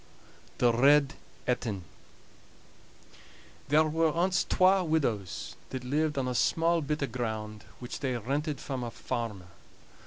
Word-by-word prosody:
THE 120 Hz, -1 st, +4 dB
RED 140 Hz, +4 st, +5 dB, 0.3 s
ETIN 115 Hz, -6 st, -1 dB, 1.9 s
There 155 Hz, +2 st, +5 dB
were 160 Hz, +1 st, +2 dB
ance 185 Hz, +2 st, +2 dB
twa 185 Hz, +1 st, +4 dB
widows 115 Hz, -, -1 dB
that 130 Hz, -1 st, -5 dB
lived 150 Hz, +3 st, 0 dB
on 130 Hz, -2 st, 0 dB
a 125 Hz, -, -1 dB
small 165 Hz, +6 st, +2 dB
bit 150 Hz, 0 st, -2 dB
o' -, -, +3 dB
ground, 110 Hz, -4 st, -4 dB
which 125 Hz, -, -7 dB
they 130 Hz, -3 st, -1 dB
rented 140 Hz, +5 st, -2 dB
from 135 Hz, -4 st, -4 dB
a 120 Hz, -, -3 dB
farmer. 105 Hz, -6 st, -5 dB
135 Hz, 130 wpm, -29 LUFS, 120-155 Hz, 1.9 s, RED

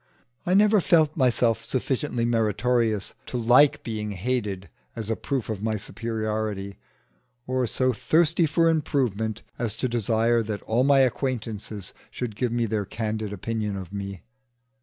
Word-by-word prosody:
I 180 Hz, -, +3 dB
never 210 Hz, 0 st, +5 dB
felt 155 Hz, -3 st, +3 dB
myself 120 Hz, -4 st, +2 dB
sufficiently 125 Hz, 0 st, -1 dB
meritorious 115 Hz, -1 st, +1 dB
to 125 Hz, -, -3 dB
like 135 Hz, +5 st, +5 dB
being 105 Hz, -2 st, -3 dB
hated 100 Hz, -2 st, -2 dB, 0.3 s
as 115 Hz, -1 st, -3 dB
a -, -, +1 dB
proof 135 Hz, -1 st, -3 dB
of 110 Hz, -3 st, -4 dB
my 110 Hz, 0 st, 0 dB
superiority, 110 Hz, -2 st, -3 dB, 0.7 s
or 130 Hz, -1 st, 0 dB
so 130 Hz, +2 st, +1 dB
thirsty 165 Hz, +6 st, +2 dB
for 165 Hz, +2 st, +3 dB
improvement 125 Hz, -9 st, 0 dB, 0.2 s
as 115 Hz, -3 st, -2 dB
to 130 Hz, -, -1 dB
desire 115 Hz, 0 st, +2 dB
that 105 Hz, -2 st, -4 dB
all 120 Hz, +3 st, +1 dB
my 140 Hz, 0 st, +5 dB
acquaintances 115 Hz, -6 st, -2 dB, 0.2 s
should 120 Hz, -4 st, -5 dB
give 120 Hz, +2 st, -1 dB
me 120 Hz, 0 st, +1 dB
their 110 Hz, -1 st, -1 dB
candid 110 Hz, +1 st, -3 dB
opinion 105 Hz, +1 st, -3 dB
of 95 Hz, 0 st, -8 dB
me. 100 Hz, -2 st, -5 dB
115 Hz, 145 wpm, -25 LUFS, 105-130 Hz, 0.7 s, never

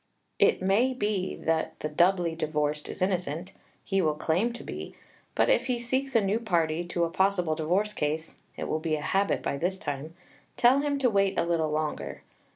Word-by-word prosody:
It -, -, +4 dB
may 230 Hz, +8 st, +3 dB
be 205 Hz, -5 st, -1 dB
that 160 Hz, 0 st, -1 dB
the -, -, -1 dB
doubly 175 Hz, +2 st, +2 dB
divorced 150 Hz, -2 st, -1 dB
is -, -, -3 dB
innocent, 180 Hz, -1 st, -2 dB, 0.3 s
he 195 Hz, -1 st, +1 dB
will 155 Hz, -3 st, +1 dB
claim 170 Hz, +9 st, +1 dB
to 240 Hz, -, -8 dB
be; -, -, -7 dB, 0.4 s
but -, -, +3 dB
if 250 Hz, -, +3 dB
he 250 Hz, -2 st, +1 dB
seeks 260 Hz, +2 st, -1 dB
a 230 Hz, -, +6 dB
new 205 Hz, +4 st, +1 dB
party 170 Hz, -6 st, 0 dB
to 175 Hz, 0 st, -1 dB
a 170 Hz, -, +1 dB
possible 190 Hz, -3 st, +2 dB
divorce 180 Hz, +7 st, 0 dB
case 155 Hz, -1 st, -2 dB, 0.2 s
(it -, -, -4 dB
will 155 Hz, -, -1 dB
be 160 Hz, -1 st, 0 dB
a 150 Hz, -, -4 dB
habit 195 Hz, +6 st, +1 dB
by 140 Hz, -, -1 dB
this 180 Hz, +6 st, -1 dB
time), 145 Hz, +1 st, -5 dB, 0.4 s
tell 250 Hz, +3 st, +5 dB
him 285 Hz, 0 st, 0 dB
to 265 Hz, -3 st, +3 dB
wait 195 Hz, -1 st, +2 dB
a -, -, +3 dB
little 165 Hz, -2 st, +1 dB
longer. 155 Hz, 0 st, -3 dB
180 Hz, 195 wpm, -28 LUFS, 155-205 Hz, 0.4 s, a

